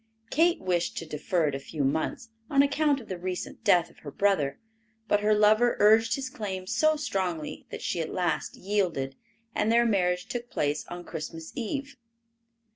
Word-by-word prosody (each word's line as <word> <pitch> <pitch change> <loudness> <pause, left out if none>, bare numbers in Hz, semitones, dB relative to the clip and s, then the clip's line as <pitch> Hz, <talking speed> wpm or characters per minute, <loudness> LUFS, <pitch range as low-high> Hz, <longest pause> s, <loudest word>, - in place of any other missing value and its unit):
Kate 340 +3 +3
wished 175 -2 -1
to 165 - -3
defer 160 +1 0
it - - -5
a 135 - -2
few 145 +1 -4
months, 160 - -1 0.2
on 280 -1 +5
account 285 0 +2
of 230 - -12
the 185 -2 -5
recent 180 0 -5
death 175 -1 +4
of - - -22
her 145 - -8
brother, 150 -4 +1 0.5
but 205 - +3
her 210 +1 +3
lover 215 +3 +4
urged 225 +2 +5
his 270 -1 -4
claim 205 -8 -5
so 310 +10 +3
strongly 185 - -3
that - - -7
she 170 - -1
at 160 - -4
last 175 -4 -1
yielded, 180 -9 -1 0.4
and 220 - +1
their 235 +1 +5
marriage 180 -4 +1
took 240 +1 -5
place 145 +1 -1
on 175 0 -7
Christmas 160 0 -7
eve. 275 +4 -4
190 Hz, 180 wpm, -28 LUFS, 165-235 Hz, 0.5 s, on